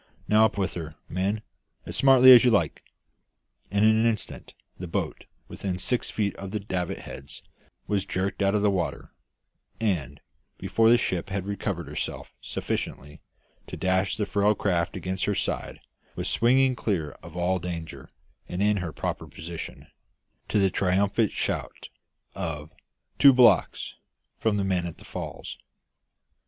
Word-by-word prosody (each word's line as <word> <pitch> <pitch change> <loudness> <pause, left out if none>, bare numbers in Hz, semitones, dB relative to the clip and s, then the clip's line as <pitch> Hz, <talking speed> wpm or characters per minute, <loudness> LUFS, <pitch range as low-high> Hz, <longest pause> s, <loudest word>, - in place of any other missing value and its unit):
"Now, 110 +1 +6
up 110 - -1
with 95 -1 -1
her, 80 -3 -6
men, 100 +4 -1 0.4
as - - -5
smartly 130 -1 +8
as 125 -2 +10
you 125 - +5
like!" 100 -9 +1 0.9
And 100 +2 +2
in 110 - +7
an 110 +1 +3
instant 110 -3 -3 0.2
the 90 - -5
boat, 85 - -3 0.2
within 95 -2 -4
six 120 +7 -1
feet 100 -3 -1
of 95 - -6
the 105 +2 -3
davit 95 -3 -3
heads, 70 +1 -10 0.4
was 100 -2 0
jerked 95 +2 -2
out 100 +1 +2
of 105 - +1
the 105 - +4
water, 90 -3 -3 0.7
and, 75 - -1 0.4
before 115 0 +2
the 120 - +7
ship 90 -5 -2
had 95 -1 -3
recovered 100 -5 -3
herself 75 - -5
sufficiently 75 +3 -4 0.5
to - - -7
dash 95 +1 +1
the 105 - 0
frail 105 +1 +2
craft 90 -5 0
against 95 0 -2
her 105 - 0
side, - - -2 0.4
was - - -3
swinging 130 +2 +3
clear 90 -11 -1
of 85 +1 -11
all 90 +1 +1
danger, 85 -2 -6 0.4
and 90 - -4
in 105 0 +3
her 90 -4 -3
proper - - -4
position, 85 0 -8 0.6
to - - 0
the 95 -2 +3
triumphant 100 +4 +1
shout - - -4 0.4
of 80 -5 -5 0.5
"Two 140 -1 +9
blocks" 120 -8 +4 0.5
from 110 -2 +1
the 100 - 0
men 90 -3 0
at 85 - -8
the - - -15
falls. - - -7
95 Hz, 155 wpm, -26 LUFS, 90-105 Hz, 0.9 s, as